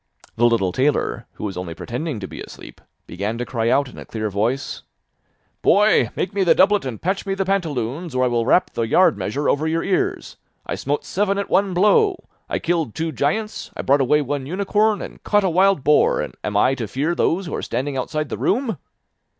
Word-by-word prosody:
The 120 +1 +4
little 110 -6 +1
tailor, 135 +8 0
who - - -10
was 100 -3 -3
only 90 -2 -5
pretending 125 - -4
to 95 - -5
be - - -9
asleep, - - -11 0.2
began 100 +6 -4
to 120 - -3
cry 115 -2 -1
out 140 +2 +2
in - - -11
a - - -9
clear 110 -2 -4
voice: 115 +7 -1 0.8
'Boy, 210 +2 +4
make 185 - -2
me 200 -1 +1
the 175 - +4
doublet 205 -2 +4
and 125 -5 -5
patch 190 +3 -2
me 195 - 0
the 195 0 -1
pantaloons, 160 - -2
or 130 - +2
I - - +3
will 120 -1 +1
rap 180 - +3
the - - -2
yard 185 - +4
measure 105 +9 -2
over 155 +3 +1
your 165 +1 0
ears. 190 -2 -1 0.3
I - - -3
smote 145 +2 -2
seven 200 0 0
at 200 - -3
one 195 -2 +2
blow. 360 - +3 0.3
I - - 0
killed 165 -9 -1
two 160 0 -2
giants, 185 - -2
I - - -3
brought 140 +1 +3
away 150 +3 +3
one 140 -1 -3
unicorn, 205 +4 +1
and - - -10
caught 205 -1 +2
a 190 - +1
wild 190 -3 +3
boar, 150 +1 +4
and - - -4
am 105 -1 -1
I 130 - +4
to 120 -5 -4
fear 145 - -1
those 175 +2 0
who 165 - -6
are - - -2
standing 135 +4 -3
outside 155 +3 -2
the - - -5
room. 225 - 0
150 Hz, 215 wpm, -21 LUFS, 120-190 Hz, 0.8 s, The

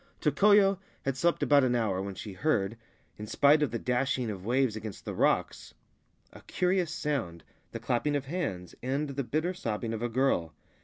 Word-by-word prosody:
Tokoyo 195 +6 +4 0.2
had 135 -1 -1
slept 170 +6 +1
about 145 -1 +5
an 125 -1 +2
hour 105 -6 0
when 100 0 -5
she 100 +1 -7
heard, 110 -4 0 0.4
in 105 - -6
spite 145 +7 +4
of 150 - +2
the 115 - -3
dashing 125 0 -1
of 95 -3 -7
waves 125 +1 +1
against 110 -2 -7
the - - -4
rocks, - - 0 0.6
a - - -13
curious 180 -2 +1
sound, 140 - -3 0.3
the - - -5
clapping 145 +5 0
of 140 -1 -2
hands 135 - -4
and 140 +4 -2
the 140 0 -3
bitter 155 +9 -1
sobbing 115 -7 -3
of 110 - -4
a 120 - -1
girl. 115 -10 0
130 Hz, 185 wpm, -29 LUFS, 110-150 Hz, 0.6 s, about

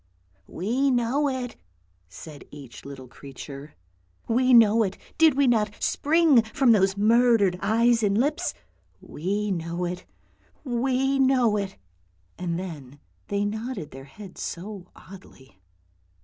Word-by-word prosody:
" 95 +1 -38
We 245 +10 -1
know 255 +4 +1
it," 255 -2 -5 0.5
said 145 - -11
each 140 -5 -12
little 135 -2 -9
creature. 140 +2 -11 0.2
" - - -41 0.3
We 255 +3 +2
know 230 -2 +6
it; 195 -3 -1 0.2
did 320 -4 +5
we 280 0 +3
not 215 -4 +1
spring 310 -4 +3
from 235 +3 +2
those 195 -2 +3
murdered 220 -4 +3
eyes 235 +2 +2
and 205 -1 +1
lips? 280 +6 0 0.4
We 200 +6 -3
know 170 0 -3
it, 180 +1 -6 0.6
we 265 +1 0
know 255 -5 +3
it! 200 -2 -4 0.3
" 90 0 -40
and 170 -2 -2
then 145 -7 -8 0.3
they 205 0 -1
nodded 220 - -5
their 135 0 -11
heads 190 +6 -12
so 185 +1 -7
oddly. 135 - -16
210 Hz, 135 wpm, -25 LUFS, 170-245 Hz, 0.6 s, know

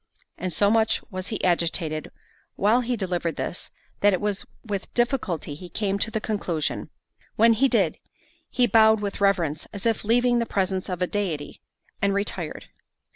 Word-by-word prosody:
And 185 +1 -2
so 205 +4 +3
much 225 -1 +2
was 185 0 -4
he 215 - -4
agitated 165 -3 0 0.5
while 220 +5 +3
he 245 0 -1
delivered 175 -5 -1
this, - - -4 0.3
that 205 0 +4
it 185 - +1
was 205 -1 -1 0.2
with 200 -3 -4
difficulty 235 - 0
he 175 +5 -9
came 200 +2 -1
to 220 - 0
the 220 -1 -2
conclusion. 185 -8 -2 0.5
When 230 +1 +6
he 260 +5 +3
did, - - +1 0.5
he 250 - +3
bowed 220 -2 +5
with 200 -1 -4
reverence, 170 -7 +1
as 200 0 -7
if 225 -2 +1
leaving 240 +2 +3
the 235 - -1
presence 190 -1 -1
of 180 -1 -1
a - - +3
deity, 175 -8 -3 0.4
and 200 0 +2
retired. 195 -5 -2
200 Hz, 170 wpm, -25 LUFS, 180-220 Hz, 0.5 s, When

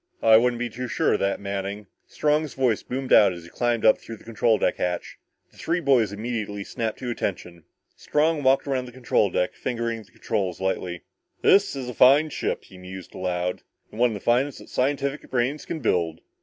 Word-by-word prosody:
"I 110 -1 +7
wouldn't 120 +2 +4
be 120 0 -2
too 125 +2 -6
sure - - +1
of - - +1
that, 100 0 0
Manning!" 100 +1 -4 0.2
Strong's 150 0 0
voice 125 -5 +1
boomed 130 +1 -2
out 100 -3 +7
as 85 -1 -9
he 85 - -14
climbed 120 -2 0
up 110 - +6
through 115 - -9
the - - -19
control 115 -1 +1
deck 90 - 0
hatch. 90 -1 -3 0.3
The - - -23
three 170 +2 -1
boys 130 - +3
immediately 105 -2 -4
snapped 110 +1 -3
to 125 -2 -4
attention. 90 -6 -4 0.3
Strong 155 +1 +1
walked 135 0 +3
around 130 -3 -1
the - - -10
control 120 -5 +1
deck, 90 0 0
fingering 115 -2 -3
the 110 +2 -19
controls 95 -6 -2
lightly. 90 -2 -2 0.4
"This 200 -5 +4
is 130 -2 -5
a 125 - -5
fine 140 +6 +5
ship," - - -2
he 95 - -15
mused 90 0 -10
aloud. 90 0 -2 0.3
"One 120 +3 +2
of - - -4
the - - -5
finest 125 +4 +1
that - - -13
scientific 140 +2 -1
brains 130 +4 -1
can 160 - -5
build. 85 -8 0
115 Hz, 200 wpm, -25 LUFS, 100-130 Hz, 0.4 s, I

